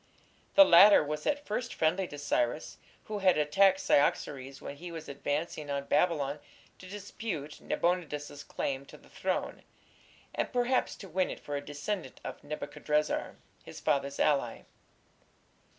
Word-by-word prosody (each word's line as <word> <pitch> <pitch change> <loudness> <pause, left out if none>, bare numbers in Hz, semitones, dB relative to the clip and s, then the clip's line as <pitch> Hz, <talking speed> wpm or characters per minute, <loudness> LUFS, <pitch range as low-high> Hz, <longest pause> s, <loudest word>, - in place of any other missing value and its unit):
The 295 - +10
latter 195 - +8
was 150 +1 -4
at 290 0 0
first 240 +3 -3
friendly 180 +4 +1
to 145 - -9
Cyrus, 140 -1 -1 0.2
who 210 -1 -4
had 185 -4 +4
attacked 190 +6 +4
Cyaxares 135 -1 +1
when 140 - -8
he 175 +3 -8
was 165 -2 -7
advancing 145 +2 -3
on 140 0 -1
Babylon 145 -5 +1 0.4
to 185 - -11
dispute 195 -6 -6
Nabonidus's 150 -5 -2
claim 135 -1 -3
to - - -12
the - - -20
throne, - - -2 0.7
and - - -2
perhaps 250 +1 +1
to 195 - -10
win 185 +1 0
it - - -6
for 145 - -5
a 140 - -2
descendant 145 +1 -5
of - - -7
Nebuchadrezzar, 150 0 -2 0.3
his - - -10
father's 140 0 0
ally. 135 -6 +1
150 Hz, 145 wpm, -30 LUFS, 145-190 Hz, 0.7 s, The